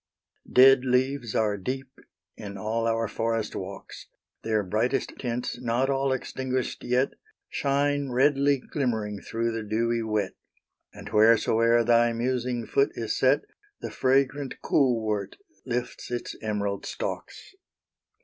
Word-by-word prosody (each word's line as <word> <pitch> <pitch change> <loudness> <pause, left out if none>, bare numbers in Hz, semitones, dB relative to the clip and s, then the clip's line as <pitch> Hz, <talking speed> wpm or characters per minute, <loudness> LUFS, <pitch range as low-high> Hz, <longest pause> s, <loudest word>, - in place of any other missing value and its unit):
Dead 130 0 +7
leaves 130 -2 0
are 105 -2 +1
deep 130 +6 -5 0.4
in 100 -2 -8
all 115 +3 -1
our 115 0 0
forest 115 0 -2
walks; 95 +1 -8 0.3
Their 110 -2 0
brightest 110 +8 -1
tints 120 0 -3
not 125 +3 +1
all 135 0 +1
extinguished 130 0 -3
yet, 125 +2 +1 0.4
Shine 140 0 0
redly 140 +2 +3
glimmering 110 -7 -3
through 115 +1 -2
the 115 0 -3
dewy 115 +2 0
wet; 105 -3 -1 0.6
And - - -10
whereso'er 115 +1 +4
thy 120 0 +4
musing 120 0 -1
foot 415 0 +2
is - - -2
set, - - +3 0.4
The - - -5
fragrant 135 +1 +1
cool 130 -5 +3
wort 105 -2 -2 0.3
lifts 125 0 -3
its 120 0 -4
emerald 100 -2 -2
stalks. - - -6
120 Hz, 125 wpm, -26 LUFS, 110-130 Hz, 0.6 s, Dead